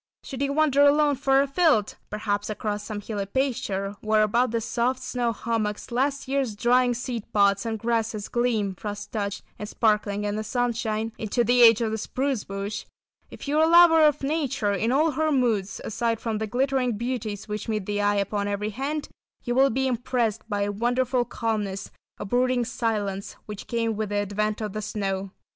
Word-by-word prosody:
Low - - -69
altitude - - -69
type] - - -11
Should 270 -1 -5
you 280 0 0
wander 290 -2 +3
alone 290 0 +5
far 270 0 +3
afield, 280 - +2
perhaps 210 -1 -2
across 210 -1 -3
some 210 -2 -5
hilly 205 -1 -4
pasture 210 -6 -1
where 215 0 +3
above 235 +4 +2
the 230 +1 0
soft 245 +3 -1
snow 245 -2 -1
hummocks 220 -1 -3
last 275 +3 0
year's 265 -5 -1
drying 245 +2 +3
seed 235 -2 -5
pods 200 +1 +3
and 225 -1 -2
grasses 225 -2 -1
gleam 230 -5 0
frost 205 +2 -7
touched 205 -2 -3 0.2
and 210 - -5
sparkling 210 -3 +1
in 205 0 -1
the 215 - -2
sunshine, 225 -2 -1
into 225 +3 0
the 245 +2 +3
edge 230 -1 +7
of 225 -2 0
the 220 - -2
"spruce 260 0 -2
bush," 200 +2 -5 0.4
if - - -10
you 295 +2 +2
are 315 - +6
a - - +2
lover 335 -1 +7
of 295 -2 +3
nature 275 -7 0
in 225 +4 0
all 305 +4 +3
her 310 +1 0
moods, 230 -8 0
aside 230 0 -1
from 225 -2 -2
the 220 - -2
glittering 255 -1 0
beauties 225 -4 -4
which 210 +1 -4
meet 215 -3 -1
the 205 0 -1
eye 205 0 +2
upon 200 0 -1
every 205 +1 -2
hand, 285 +6 -3 0.4
you 240 - -1
will 270 +2 +5
be 265 +2 0
impressed 245 -3 0
by 205 -1 0
a 205 - -1
wonderful 245 +3 +1
calmness, 215 -5 -3 0.3
a - - -6
brooding 245 +2 +1
silence, 215 -5 -2
which 210 -2 -8
came 230 -2 -1
with 215 -1 -3
the 205 - -3
advent 205 +2 -1
of 210 -3 -4
the 215 - -3
snow. 195 -2 -3
225 Hz, 195 wpm, -25 LUFS, 210-255 Hz, 0.4 s, edge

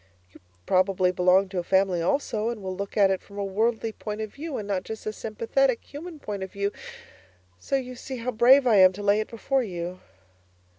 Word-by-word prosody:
You - - -17 0.3
probably 185 0 +2
belong 185 +2 +3
to 185 -1 -3
a - - -3
Family 190 -1 +2
also, 220 +2 0
and 230 -4 -5
will 185 0 -4
look 200 +2 -6
at 195 -2 +5
it 190 - -1
from 200 - -14
a 200 - -1
worldly 220 +3 0
point 210 0 -6
of 215 -1 -5
view 300 -1 -5
and 210 - -5
not 195 -2 -1
just 220 +3 -8
a 215 - -2
sympathetic, 230 +4 0
human 320 +3 -9
point 205 -8 -6
of 190 - -5
view 200 0 -2 0.9
so 180 - -2
you 255 -2 -2
see 260 +1 -7
how 245 +2 -3
brave 250 +4 +6
I 225 -4 +5
am 185 -1 +7
to 205 +2 -7
lay 205 +1 +3
it 215 - -3
before 265 +4 0
you. 180 -4 -5
210 Hz, 215 wpm, -26 LUFS, 190-240 Hz, 0.9 s, am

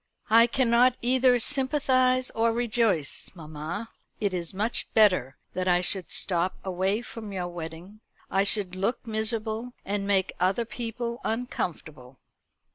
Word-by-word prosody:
"I 230 +1 +7
cannot 245 0 +3
either 255 0 +4
sympathise 255 -1 +2
or 230 +1 +1
rejoice, 225 -9 0
mamma. 160 +6 -6 0.3
It 200 -3 0
is 170 -2 -3
much 210 +5 -2
better 180 - +4 0.2
that 185 0 -2
I 175 -1 +4
should 180 0 -1
stop 180 0 +2
away 190 +4 0
from 220 -3 -8
your 185 -2 -3
wedding. 175 +4 -8 0.3
I 195 +1 +1
should 200 -2 +2
look 195 +7 -2
miserable, 220 +1 -3
and 200 0 -2
make 195 -2 +1
other 190 +6 +1
people 235 +1 -5
uncomfortable." 155 - -4
210 Hz, 130 wpm, -27 LUFS, 180-235 Hz, 0.3 s, I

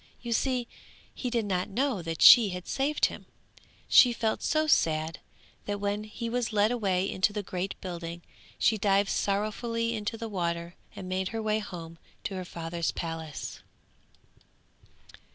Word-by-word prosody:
You 235 -1 -3
see 250 0 0 0.5
he 250 - -3
did 230 -2 0
not 185 -2 -1
know 250 -1 0
that 165 -1 -2
she 230 -5 +10
had 180 -1 -6
saved 285 +3 +1
him. - - -5 0.6
She 245 -2 +7
felt 220 -1 -1
so 310 +1 +1
sad 160 - +2 0.5
that 205 0 -3
when 205 +1 -2
he 215 +2 -6
was 240 0 -1
led 210 +1 +3
away 195 -6 0
into 190 +2 +1
the 205 0 -3
great 185 +1 -4
building 170 -2 -6 0.3
she 220 - +2
dived 195 0 +3
sorrowfully 230 +3 -1
into 220 0 -3
the 230 - -5
water 170 -4 -2 0.2
and 185 - -7
made 185 0 -1
her 225 +2 -4
way 215 0 +1
home 165 -5 -8 0.2
to - - -4
her 185 -1 -4
father's 170 -1 -3
palace. 165 -3 -5
200 Hz, 155 wpm, -28 LUFS, 175-230 Hz, 0.6 s, she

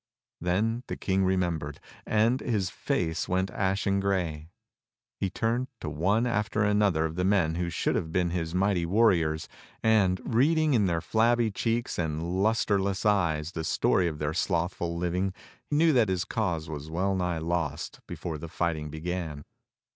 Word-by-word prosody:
Then 105 +7 0
the - - -4
King 95 0 +1
remembered, 85 -6 -1 0.3
and 115 +4 +3
his 100 -7 -1
face 80 -1 -1
went 95 +1 0
ashen 100 0 0
grey. 85 -6 -1 0.7
He 95 - 0
turned 115 +6 -1
to 75 - -5
one 100 +10 +1
after 105 -2 0
another 105 -6 +2
of 80 - -3
the 90 - +1
men 95 -5 +2
who 85 +1 -2
should - - 0
have 80 - -2
been 90 0 +1
his 85 -1 -2
mighty 95 -2 +2
warriors, 85 -5 +2 0.4
and, 100 -5 +3
reading 150 +5 +3
in 105 -5 +3
their 85 -2 0
flabby 115 +2 +2
cheeks 115 +2 -1
and 85 +3 -1
lustreless 100 -3 +1
eyes 85 -6 +2
the 80 -2 -4
story 85 +2 +2
of 80 -3 -3
their 75 0 -2
slothful 85 0 -1
living, 90 +2 -1 0.3
knew 155 +2 +4
that 120 -6 +4
his 90 -1 0
cause 85 -8 -2
was 75 -1 -6
well 95 +4 0
nigh 90 -2 -1
lost 80 -2 -2
before 80 -3 -5
the 85 - -7
fighting 80 -3 -2
began. 80 -1 -4
90 Hz, 160 wpm, -28 LUFS, 80-105 Hz, 0.7 s, knew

